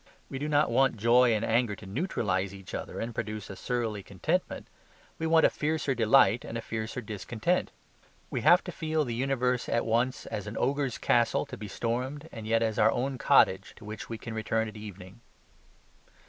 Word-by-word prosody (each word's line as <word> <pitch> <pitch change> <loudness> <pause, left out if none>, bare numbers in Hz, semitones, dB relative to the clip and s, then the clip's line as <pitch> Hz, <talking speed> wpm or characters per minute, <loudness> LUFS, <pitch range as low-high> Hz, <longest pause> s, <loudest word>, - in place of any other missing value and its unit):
We 135 - -4
do 150 +2 -2
not 150 0 +3
want 135 -3 +3
joy 120 +3 +5
and 110 +1 -1
anger 115 -2 +1
to 100 - -12
neutralize 100 - -1
each 95 -1 -11
other - - -5
and 115 +1 -4
produce 110 -3 -5
a - - -7
surly 115 -2 -2
contentment; 95 -2 -2 0.5
we 160 - -1
want 160 0 +5
a - - +6
fiercer 150 -2 -1
delight 115 -1 +4
and 115 - -5
a - - -4
fiercer 110 +2 -4
discontent. 110 - -1 0.6
We - - -2
have - - +6
to - - -6
feel 155 -2 -1
the 120 - -3
universe 125 0 0
at 115 - +1
once 120 +3 0
as 105 -2 -5
an 105 - -6
ogre's 135 -1 0
castle, 120 -1 +2
to - - -8
be 105 - -7
stormed, 130 +8 -3
and 110 -2 -8
yet 115 0 +2
as 110 -2 -1
our 110 +1 +5
own 130 +1 -2
cottage, - - +4
to - - -14
which 105 0 -7
we 115 - -4
can 115 +1 -7
return 110 0 -1
at 110 - -9
evening. 100 -1 -10
115 Hz, 195 wpm, -29 LUFS, 110-130 Hz, 0.6 s, a